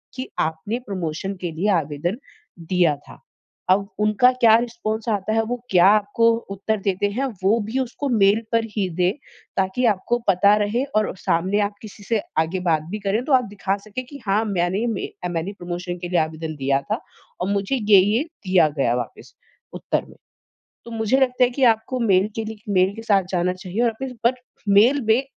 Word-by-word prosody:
कि 255 0 -5
आपने 160 +9 -2
प्रमोशन 185 0 -3
के 175 -2 -3
लिए 175 +6 -1
आवेदन 155 +7 -3 0.4
दिया 170 -2 +2
था। 145 - -16 0.5
अब 200 +2 +3
उनका 215 +4 +4
क्या 235 -3 +5
रिस्पॉन्स 230 -2 -4
आता 210 0 -1
है, 225 - +3
वो 245 +3 -3
क्या 180 -1 +6
आपको 210 +2 +4 0.3
उत्तर 210 +3 -1
देते 195 +1 +1
हैं, 255 +6 -1 0.2
वो 210 +5 +3
भी 230 +5 -2
उसको 265 +2 -3
मेल 210 -2 +4
पर 230 -1 +2
ही 195 -4 0
दे 180 +1 +2 0.5
ताकि 190 +6 0
आपको 220 +5 -1
पता 200 +2 +5
रहे 225 +5 0
और 215 - +1
सामने 185 +3 0
आप 205 0 -5
किसी 210 -1 -11
से 220 +1 0 0.2
आगे 165 +4 0
बात 155 -2 +2
भी 210 - -3
करे, 200 +3 0
तो 275 +3 -1
आप 255 -1 +5
दिखा 200 -1 -2
सके 215 +4 -5
कि 280 +3 -11
हाँ 200 +3 +2
मैंने 190 +1 0
में 225 -4 -2 0.2
मैंने 175 +3 -3
प्रमोशन 175 0 -5
के 175 - -3
लिए 180 - +2
आवेदन 155 0 -3
दिया 135 0 +1
था - - 0 0.4
और 180 - -1
मुझे 200 +6 0
ये-ये 210 +1 +4
दिया 190 - +1
गया 120 -3 +2
वापस 120 -2 -6 0.4
उत्तर - - -2
में। - - -16 0.7
तो 235 - -9
मुझे 225 +2 +1
लगता 250 -1 +3
है 245 - +4
कि 265 +2 -1
आपको 225 +3 -1
मेल 195 -4 +3
के 225 - -2
लिए 215 0 -7
मेल 185 +1 +3
के 225 - -7
साथ 200 -4 +3
जाना 180 0 +1
चाहिए 185 +4 -4
और 230 - +1
इस 265 - -4
बट 245 +2 +4 0.3
मेल 230 +8 +5
में 225 +4 +4
205 Hz, 195 wpm, -22 LUFS, 180-230 Hz, 0.7 s, क्या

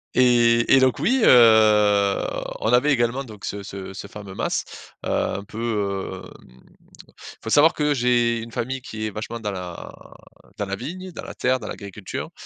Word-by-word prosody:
Et 120 -1 +4
et - - +6
donc, 130 -1 +3
oui, 260 0 +2
heu, 105 -4 +5 0.4
on 110 +3 +1
avait 135 +5 +4
également 125 +2 0
donc 105 -5 -11
ce 100 - -4
ce 95 -1 -8
ce 100 - -8
fameux 100 -1 -10
mas, - - -1 0.4
heu, - - -3
un 100 - -1
peu, 100 -4 -3
hem, 65 +1 -18 0.8
faut 110 - -5
savoir 155 +6 +6
que 150 -1 +1
j'ai 120 -2 +2
une 115 - -9
famille 130 +3 -3
qui 110 -3 -6
est - - -5
vachement 110 +3 -6
dans 105 -2 -3
la 90 -3 -7 0.6
dans 105 - -2
la 100 0 -3
vigne, 180 - -7
dans - - -7
la - - -9
terre, 130 0 +1
dans 105 - -8
l'agriculture. 100 -1 -7
115 Hz, 180 wpm, -23 LUFS, 100-125 Hz, 0.8 s, et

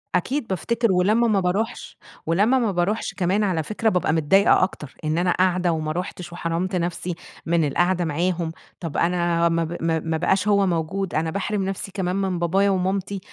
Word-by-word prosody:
أكيد 255 +7 -1
بافتكر 230 +4 0
ولمّا 210 +6 +3
ما 205 -3 +3
باروحش 200 +6 -2 0.3
ولمّا 205 +11 +3
ما 225 -4 +1
باروحش 185 +5 -1
كمان 195 +3 +1
على 175 -6 0
فكرة 215 +5 0
بابقى 180 -4 +1
متضايقة 185 +6 +4
أكتر، 150 -6 -4
إن 155 +1 0
أنا 180 0 +2
قاعدة 180 -1 +2
وما 155 -1 -2
رُحتش 180 0 -5
وحرمت 175 +2 -2
نفْسي 175 0 -2 0.3
من 165 -2 +2
القاعدة 175 +3 +1
معاهم، 170 +1 -1 0.3
طب 165 -4 -5
أنا 170 -1 +2
ما 165 0 +1
ب 165 +2 -4
ما 165 -1 +1
ما 160 0 -2
بقاش 190 +4 +1
هو 200 -2 +3
موجود، 175 +2 -2
أنا 160 +1 0
باحرم 200 +1 -2
نفْسي 195 0 -4
كمان 185 -2 -2
من 190 -3 -1
بابايا 190 +4 +2
ومامتي، 190 +1 -1
180 Hz, 180 wpm, -23 LUFS, 170-195 Hz, 0.3 s, متضايقة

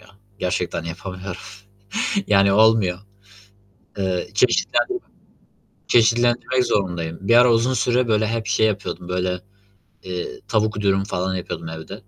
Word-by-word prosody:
ya. 110 - -19 0.3
Gerçekten 90 -2 -2
yapamıyorum. 95 +1 -7 0.9
Yani, 100 -1 +4
olmuyor. 110 -4 +4 1.0
Iıı, 95 -2 -1
çeşitlendirme 125 - +2 0.9
çeşitlendirmek 120 +2 +3
zorundayım. 90 -7 -1
Bir 115 +5 +3
ara 120 0 +7
uzun 115 +3 +2
süre 125 0 +1
böyle 110 -1 +2
hep 115 0 -2
şey 110 0 +3
yapıyordum, 95 -4 -4
böyle, 90 0 -1 0.6
eee, 90 -1 -5
tavuk 110 -1 0
dürüm 95 -1 +2
falan 95 -2 -2
yapıyordum 85 -2 -5
evde. 80 +3 -8
100 Hz, 120 wpm, -22 LUFS, 90-115 Hz, 1.0 s, ara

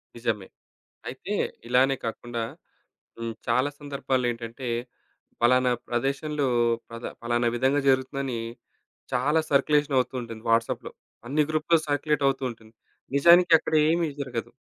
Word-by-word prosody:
నిజమే. 115 -4 -2 0.6
అయితే - - -5 0.3
ఇలానే 130 +2 +4
కాకుండా 120 +1 -4 0.8
హ్మ్, 115 0 -3
చాలా 130 +3 +2
సందర్భాల్లో 135 -3 -1
ఏంటంటే, 115 +2 -7 0.7
పలానా 125 +1 +4 0.2
ప్రదేశంలో 140 +4 -1 0.4
ప్రద 115 +1 -9 0.2
పలానా 120 0 +1
విధంగా 135 +4 +2
జరుగుతుందని, 130 -1 0 0.8
చాలా 140 +6 +2
సర్క్యులేషన 145 +1 +3
వుతూ 125 +1 -8
ఉంటుంది. 115 -2 -9
వాట్సాప్‌లో 115 0 +1 0.4
అన్ని 150 +4 +2
గ్రూపూలో 160 +1 +3
సర్క్యులేటవుతూ 145 -2 +1
ఉంటుంది. 110 -1 -16 0.4
నిజానికి 170 +4 +6
అక్కడ - - -5 0.2
ఏమి 170 0 +1
జరగదు. 125 -4 -4
130 Hz, 110 wpm, -26 LUFS, 120-145 Hz, 0.8 s, నిజానికి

